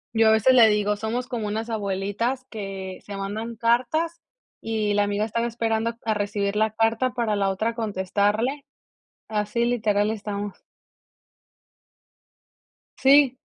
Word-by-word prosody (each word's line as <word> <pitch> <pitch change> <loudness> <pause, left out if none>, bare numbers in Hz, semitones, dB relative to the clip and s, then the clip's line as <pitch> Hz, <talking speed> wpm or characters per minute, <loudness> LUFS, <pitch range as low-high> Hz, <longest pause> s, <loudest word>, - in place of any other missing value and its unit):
Yo 225 0 +5
a - - +6
veces 220 +4 +5
le 235 -3 +8
digo, 210 -1 +2
somos 225 +4 -3
como 230 -5 -3
unas 220 +2 -3
abuelitas, 205 +5 -2
que 195 -3 -6
se 200 -1 -7
mandan 215 +4 -4
cartas, 255 +9 0 0.4
y 215 -2 -1
la 205 0 +3
amiga 205 +1 0
estaba 230 +2 -1
esperando 230 0 -1
a 220 - +2
recibir 205 0 -1
la 220 +1 +2
carta, 225 +3 +1
para 230 -4 0
la 195 -1 +1
otra 220 +4 -1
contestarle, 215 +5 -1 0.7
así 215 +2 0
literal 215 -3 +1
estamos. 205 -2 -5 2.4
Sí. 270 -1 +5
220 Hz, 135 wpm, -24 LUFS, 205-235 Hz, 2.4 s, le